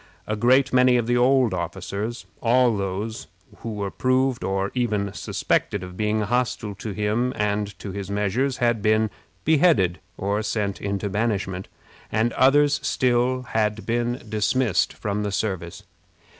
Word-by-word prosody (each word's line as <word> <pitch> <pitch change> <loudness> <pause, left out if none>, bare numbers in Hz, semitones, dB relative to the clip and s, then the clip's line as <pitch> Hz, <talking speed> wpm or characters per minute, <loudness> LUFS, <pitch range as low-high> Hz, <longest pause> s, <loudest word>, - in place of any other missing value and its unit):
A 110 - -2
great 130 +5 +3
many 125 -1 +5
of 120 - 0
the 120 +1 +1
old 125 -3 +4
officers 95 +6 -4 0.2
all 120 0 +4
those 105 +6 -4 0.3
who 115 - -6
were 100 -2 -3
proved 130 0 +1
or 95 +1 -1
even 105 -6 -1
suspected 100 -3 -1
of 90 0 -8
being 110 +1 0
hostile 115 -1 -1
to 100 +3 -7
him 110 +5 0
and 105 -1 -1
to 100 - -7
his 100 0 -6
measures 105 +7 0
had 120 -3 +1
been 110 0 +2 0.3
beheaded 140 - +3 0.2
or 100 +2 -1
sent 105 -2 -2
into 100 0 -2
banishment, 100 -3 -2 0.4
and 115 +2 +1
others 145 +2 +4
still 125 0 +1
had 110 -2 -1
been 120 +2 -1
dismissed 110 -1 +1
from 105 -1 -3
the 105 -1 -2
service. 95 -4 -3
110 Hz, 145 wpm, -24 LUFS, 100-125 Hz, 0.4 s, many